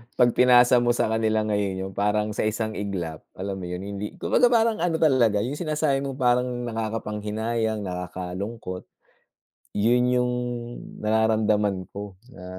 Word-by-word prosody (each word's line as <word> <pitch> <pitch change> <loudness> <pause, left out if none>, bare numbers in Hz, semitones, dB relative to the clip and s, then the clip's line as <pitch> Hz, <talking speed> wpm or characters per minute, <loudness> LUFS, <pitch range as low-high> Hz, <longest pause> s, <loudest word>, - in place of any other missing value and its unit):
'pag 120 -1 +4
pinasa 125 0 +6
mo 120 0 +2
sa 110 - +1
kanila 110 -1 +1
ngayon, 100 -3 -1
yung - - -16
parang, 105 +1 +1
sa 110 - -1
isang 110 0 -2
iglap, 90 -7 -4 0.2
alam 95 +1 -4
mo 90 - -6
'yon, 90 +1 -5
hindi 100 +1 -5
kumbaga, 245 - +3
parang 230 -3 +2
ano 170 -1 +1
talaga, 120 -10 +3
yung 135 +5 -4
sinasabi 155 -4 0
mong 135 -1 -5
parang, 125 0 +3 0.2
nakakapanghinayang, 110 0 -2
nakakalungkot, 90 +2 -5 0.9
'yon 120 +4 +3
yung 125 0 +2 0.7
nararamdaman 105 -3 +2
ko, 100 -1 -7 0.2
na 90 - -11
110 Hz, 145 wpm, -25 LUFS, 100-125 Hz, 0.9 s, pinasa